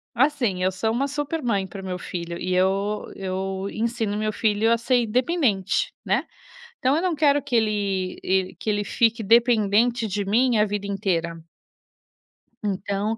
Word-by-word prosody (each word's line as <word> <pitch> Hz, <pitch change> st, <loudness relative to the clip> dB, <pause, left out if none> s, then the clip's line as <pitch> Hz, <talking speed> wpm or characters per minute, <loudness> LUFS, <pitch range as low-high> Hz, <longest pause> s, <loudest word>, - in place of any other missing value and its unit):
Assim, 245 Hz, -9 st, +1 dB
eu 185 Hz, -, +2 dB
sou 220 Hz, +4 st, -1 dB
uma 260 Hz, +5 st, 0 dB
super 295 Hz, +3 st, -3 dB
mãe 200 Hz, -5 st, 0 dB
para 195 Hz, +1 st, -8 dB
o 190 Hz, -, -9 dB
meu 180 Hz, -1 st, -3 dB
filho 170 Hz, -1 st, -5 dB
e 185 Hz, -, -2 dB
eu 195 Hz, +3 st, +1 dB
eu 190 Hz, 0 st, -3 dB
ensino 225 Hz, -2 st, -2 dB
meu 215 Hz, 0 st, -1 dB
filho 215 Hz, +1 st, +1 dB
a 235 Hz, -, +4 dB
ser 240 Hz, +1 st, +2 dB
independente, 250 Hz, -, 0 dB
né, -, -, +1 dB, 0.5 s
então 265 Hz, +3 st, +2 dB
eu 330 Hz, -, 0 dB
não 365 Hz, -2 st, +1 dB
quero 290 Hz, -1 st, +3 dB
que 280 Hz, -2 st, -5 dB
ele 200 Hz, -4 st, 0 dB
el 190 Hz, 0 st, 0 dB
que 220 Hz, -, -2 dB
ele 205 Hz, 0 st, 0 dB
fique 230 Hz, +1 st, +1 dB
dependente 230 Hz, +1 st, +3 dB
de 200 Hz, 0 st, -2 dB
mim 235 Hz, +4 st, +2 dB
a 210 Hz, -, +5 dB
vida 205 Hz, -1 st, -3 dB
inteira. 170 Hz, -5 st, -2 dB, 1.2 s
Então 200 Hz, +2 st, -2 dB
210 Hz, 170 wpm, -24 LUFS, 190-240 Hz, 1.2 s, a